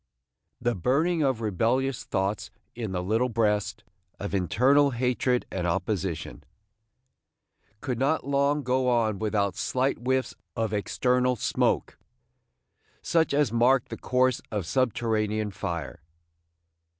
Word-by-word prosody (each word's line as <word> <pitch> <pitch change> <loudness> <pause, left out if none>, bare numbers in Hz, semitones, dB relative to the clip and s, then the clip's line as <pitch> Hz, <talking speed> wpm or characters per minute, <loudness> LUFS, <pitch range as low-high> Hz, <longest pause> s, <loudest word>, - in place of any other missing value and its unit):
The 120 0 0
burning 155 - +1
of 130 -5 +1
rebellious 115 +5 0
thoughts 95 +2 -2 0.2
in 115 -4 -5
the 90 -1 -2
little 110 +6 +1
breast, 105 -3 0 0.4
of - - -5
internal 130 +10 +3
hatred 125 0 0
and 90 -2 -2
opposition, 90 -1 -2 1.4
could 125 -4 -3
not 140 +3 +1
long 140 +1 +1
go 130 0 +1
on 110 -4 +1
without 100 -3 0
slight 130 +5 0
whiffs 130 +2 0 0.2
of 110 -2 -1
external 125 +5 +1
smoke, 110 - 0 1.0
such 165 -1 +2
as 140 -5 +2
mark 125 +2 +3
the - - -5
course 130 -1 +1
of 105 -5 -2
subterranean 110 -2 0
fire. 85 -8 -5
120 Hz, 115 wpm, -27 LUFS, 105-130 Hz, 1.4 s, internal